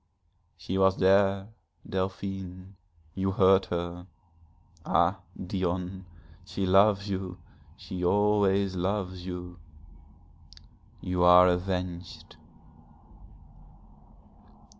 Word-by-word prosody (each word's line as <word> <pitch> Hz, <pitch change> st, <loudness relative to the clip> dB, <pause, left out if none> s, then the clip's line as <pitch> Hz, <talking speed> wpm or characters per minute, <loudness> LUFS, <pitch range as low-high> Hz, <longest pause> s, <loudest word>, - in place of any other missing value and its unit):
'She 95 Hz, +1 st, -3 dB
was 95 Hz, 0 st, +3 dB
there 95 Hz, +1 st, +3 dB, 0.4 s
Delphine 95 Hz, 0 st, -5 dB, 0.4 s
you 95 Hz, +2 st, -1 dB
heard 95 Hz, 0 st, +4 dB
her. 85 Hz, +1 st, -5 dB, 0.8 s
Ah, 90 Hz, +3 st, +1 dB, 0.2 s
Dion, 90 Hz, 0 st, -3 dB, 0.4 s
she 100 Hz, -, -4 dB
loves 100 Hz, +2 st, +4 dB
you, 95 Hz, -2 st, -4 dB, 0.4 s
she 90 Hz, -1 st, -7 dB
always 100 Hz, 0 st, +2 dB
loves 95 Hz, 0 st, -3 dB
you, 90 Hz, -1 st, -7 dB, 1.4 s
you 90 Hz, -1 st, -2 dB
are 90 Hz, +1 st, +8 dB
avenged.' 90 Hz, -2 st, -3 dB
95 Hz, 75 wpm, -28 LUFS, 90-95 Hz, 1.4 s, are